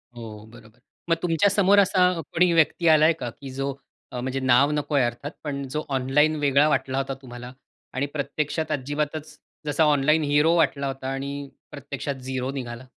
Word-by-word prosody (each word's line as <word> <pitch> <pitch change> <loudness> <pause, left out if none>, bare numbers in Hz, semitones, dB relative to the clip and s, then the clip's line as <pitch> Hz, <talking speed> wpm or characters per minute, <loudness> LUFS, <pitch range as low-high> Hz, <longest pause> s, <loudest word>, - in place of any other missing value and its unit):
हो, 110 -2 -9
बरोबर. 115 0 -17 0.3
मग 165 - +4
तुमच्या 175 +3 +2
समोर 200 0 +4
असा 185 -2 +4
कोणी 175 +4 +1
व्यक्ती 165 +1 +2
आला 155 -1 +6
आहे 165 - +5
का, 140 -7 -5
की 135 +3 -10
जो 135 +1 -3 0.4
अ, 125 - -3
म्हणजे 130 +2 -3
नाव 130 +3 +4
नको 150 0 -2
आहे 135 - +4
अर्थात, 120 +5 -5
पण 140 -2 -4
जो 150 - -2
ऑनलाईन 150 +4 +2
वेगळा 145 0 +3
वाटला 135 -1 0
होता 135 0 -2
तुम्हाला 120 -1 -9 0.4
आणि 130 +2 -1
प्रत्यक्षात 150 +2 -2
अजिबातच, 150 +3 -3 0.3
जसा 145 +2 +1
ऑनलाइन 150 +1 +3
हीरो 150 +3 +3
वाटला 140 -4 +1
होता 135 -1 -5
आणि 140 +1 -5 0.2
प्रत्यक्षात 140 0 -5
झीरो 130 0 -2
निघाला? 125 -2 -6
140 Hz, 175 wpm, -24 LUFS, 130-155 Hz, 0.4 s, आला